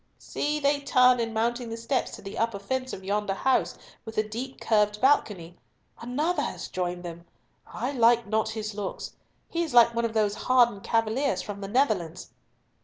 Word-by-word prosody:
"See, 300 +1 -2
they 285 0 +2
turn 255 -3 +4
in 230 -1 -1
mounting 235 +2 -1
the 225 - -5
steps 230 +3 -1
to - - -13
the 195 - -7
upper 230 -2 -1
fence 260 +6 -3
of 190 - -7
yonder 200 0 -1
house 265 +5 +1 0.3
with 225 -1 -9
the 215 - +2
deep 250 +5 -6
carved 210 -1 +2
balcony. 205 - +1 0.4
Another 295 +9 -1
has - - -5
joined 180 -1 -3
them! 170 0 -8 0.4
I 250 +5 -4
like 235 -2 +4
not 220 +1 0
his 215 -1 -4
looks. 200 -2 -5 0.3
He 340 - -2
is 320 -7 -3
like 235 0 +7
one 235 0 0
of 225 - -3
those 210 -2 +2
hardened 240 -4 +2
cavaliers 225 -1 0
from 200 -1 -7
the 195 - -5
Netherlands." 200 - 0
225 Hz, 180 wpm, -27 LUFS, 205-255 Hz, 0.4 s, like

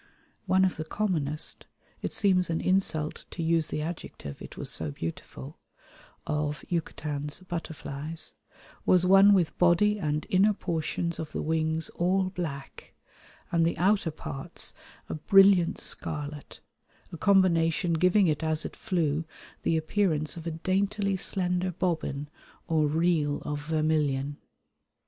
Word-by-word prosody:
One 190 +1 +4
of 185 - -1
the 155 - -3
commonest 155 -5 -2 0.3
(it - - -3
seems 185 -3 +2
an 165 - 0
insult 185 -5 +1
to 170 - -5
use 165 -1 +2
the 150 - -3
adjective, 155 - -7
it - - -10
was - - -4
so 80 - -1
beautiful) 70 -3 -7 0.7
of 150 0 -2
Yucatan's 150 -2 -3
butterflies 160 -3 -6 0.5
was 180 -1 +4
one 195 +2 +7
with 175 -4 +1
body 205 +4 +4
and 150 -3 -1
inner 200 +3 +4
portions 170 -2 -2
of 160 -2 -6
the - - -2
wings 160 0 0
all 185 +2 0
black 155 -7 -6 0.6
and 170 -1 +3
the 165 - +1
outer 195 -1 +2
parts 140 -3 -7 0.3
a - - -4
brilliant 195 +1 +5
scarlet, 150 -1 -4 0.5
a 170 - -7
combination 175 -2 +3
giving 180 +5 +4
it 150 -2 0
as 155 0 0
it - - -6
flew 165 -7 0 0.4
the 165 - +1
appearance 160 -2 0
of 170 0 -7
a - - -1
daintily 200 +1 +1
slender 180 -1 0
bobbin 160 -5 -2 0.4
or 155 -2 +2
reel 155 -2 +1
of 145 0 -4
vermilion. 150 -3 0
165 Hz, 135 wpm, -28 LUFS, 150-185 Hz, 0.7 s, one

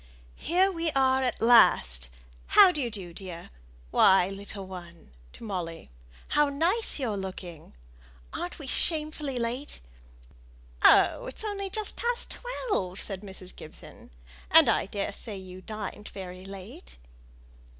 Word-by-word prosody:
"Here 370 +3 +3
we 335 -2 -1
are 265 -1 +3
at 255 -2 -1
last. 60 - +5 0.5
How 370 - +10
d'ye 285 -8 -2
do, 190 -6 -6
dear? 175 -2 -9 0.4
Why, 190 -1 +5
little 195 0 -7
one" 175 - -11 0.2
(to - - -13
Molly), 175 - -5 0.4
"how 295 -1 +3
nice 340 +11 +2
you're 245 -7 -2
looking! 185 -4 -7 0.6
Aren't 175 - -5
we 295 - -9
shamefully 300 -1 -1
late?" 245 +4 -3 1.0
"Oh! - - +6
it's 260 - -7
only 400 -2 -3
just 430 +2 -2
past 480 0 -1
twelve," 420 - -3
said 195 -2 -2
Mrs. 190 -2 -8
Gibson; 155 - -12 0.4
"and - - +7
I - - +2
daresay 200 +1 -5
you 185 -1 -10
dined 210 0 -7
very 185 -1 -9
late." 185 - -10
205 Hz, 130 wpm, -28 LUFS, 185-295 Hz, 1.0 s, How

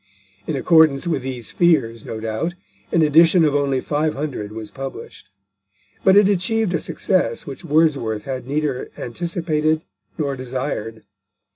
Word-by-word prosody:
In 155 - -1
accordance 155 0 +4
with 165 -6 -1
these 125 -3 -5
fears, 130 -10 +2
no 110 - -6
doubt, 115 +11 -3 0.4
an 165 - +3
edition 165 +3 +5
of 150 - +2
only 140 -2 +1
500 145 -7 -2
was 110 -1 -8
published; 135 -4 -8 0.7
but 190 +1 +6
it 205 -1 +6
achieved 205 +1 +1
a 165 - +1
success 165 -9 -1
which 140 - -8
Wordsworth 140 -9 +1
had 130 -1 -5
neither 145 -2 -2
anticipated 160 +2 -1 0.3
nor 140 -3 -1
desired. 125 -3 -4
145 Hz, 135 wpm, -21 LUFS, 125-165 Hz, 0.7 s, but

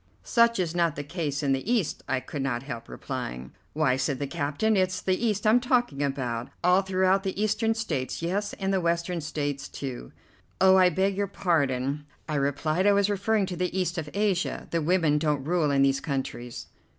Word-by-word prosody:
"Such 235 0 +3
is 175 -3 -1
not 170 -3 +1
the 145 - -4
case 145 -2 -3
in 140 - +1
the 135 - -1
East," 220 -10 0
I 135 - +1
could 140 +3 -5
not 125 -2 -1
help 120 -5 -7
replying. 65 +1 -5 0.2
"Why," 145 -4 +2
said 135 +1 -1
the 145 - -2
captain, 150 +9 0
"it's 185 -1 +1
the 185 - 0
East 210 -2 0
I'm 220 +3 +6
talking 245 - +1
about. 130 -3 -2
All 180 +2 +5
throughout 190 0 +2
the 195 0 -4
Eastern 220 +1 +1
States, 155 - -3
yes, 200 +5 -2
and 195 0 -2
the 190 - +2
Western 170 0 0
States, 145 -2 -3
too." 125 - -6 0.5
"Oh, 190 0 +6
I 185 -1 +6
beg 190 +3 +1
your 200 +1 0
pardon," 145 -6 0 0.2
I 155 - -3
replied, 155 +6 +1
"I 205 - +6
was 200 0 +2
referring 205 +1 +1
to 185 -1 -5
the 180 +1 -1
East 175 -1 -1
of 150 -2 -5
Asia. 200 -3 0
The 170 - +1
women 160 -2 +2
don't 150 -3 0
rule 165 -2 +1
in 140 -1 +3
these 135 0 +3
countries." 130 -4 -4
170 Hz, 200 wpm, -27 LUFS, 140-195 Hz, 0.5 s, I'm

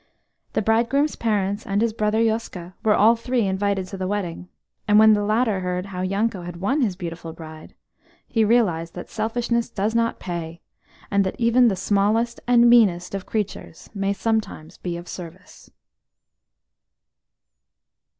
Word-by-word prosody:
The 220 - 0
bridegroom's 235 +7 +1
parents, 205 -2 -1
and 200 +1 0
his 225 0 +1
brother 215 0 0
Yoska, 220 -6 -2
were 215 -2 +4
all 225 +3 +5
three 240 -1 -1
invited 195 0 -1
to 195 - -7
the 185 0 -3
wedding; 185 -3 -4 0.4
and 210 0 +5
when 220 0 +7
the 205 - +1
latter 215 -1 +1
heard 180 0 -3
how 185 -2 -6
Yanko 195 +1 -1
had 175 0 -7
won 265 - 0
his 205 -7 0
beautiful 170 -2 -7
bride, 155 -1 -11 0.5
he 225 - +1
realised 185 -8 +1
that - - -8
selfishness 235 +1 -1
does 210 +3 -2
not 230 0 +1
pay, 170 -2 -5 0.5
and 200 -1 +3
that 190 - -3
even 240 +1 +4
the 205 - +1
smallest 210 +5 +1
and 240 -1 +5
meanest 205 -8 +4
of 195 -2 -5
creatures 210 -6 -5
may 195 -1 -1
sometimes 210 -6 -3
be 175 -2 -4
of 175 +1 -10
service. 180 +1 -11
205 Hz, 155 wpm, -23 LUFS, 185-225 Hz, 0.5 s, when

